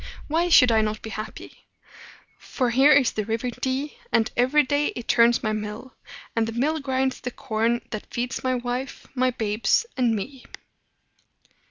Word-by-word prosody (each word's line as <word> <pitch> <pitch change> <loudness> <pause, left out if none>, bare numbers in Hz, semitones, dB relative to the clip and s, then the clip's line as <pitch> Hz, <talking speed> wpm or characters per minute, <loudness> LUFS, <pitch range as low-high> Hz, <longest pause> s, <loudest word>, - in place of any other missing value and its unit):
Why 335 +3 +1
should 250 -7 +7
I 220 -1 +4
not 215 0 -2
be 220 - -6
happy? 215 0 -8 0.7
For 250 -3 -2
here 270 +5 +5
is 275 -4 +5
the 215 - -2
River 230 +3 -2
Dee, 265 +4 -3
and 225 -1 +2
every 260 +5 +4
day 285 +2 +1
it 240 - -7
turns 235 0 +4
my 215 -1 0
mill; 215 +4 -6 0.4
and 225 -1 +1
the 225 - -4
mill 310 +4 +1
grinds 265 -2 -1
the 250 - -3
corn 230 0 -1
that 215 - -7
feeds 245 +1 -3
my 255 0 +1
wife, 245 +2 -4
my 255 -1 +2
babes, 225 - +1
and 245 -4 +2
me." 255 +6 -6
245 Hz, 170 wpm, -24 LUFS, 225-265 Hz, 0.7 s, should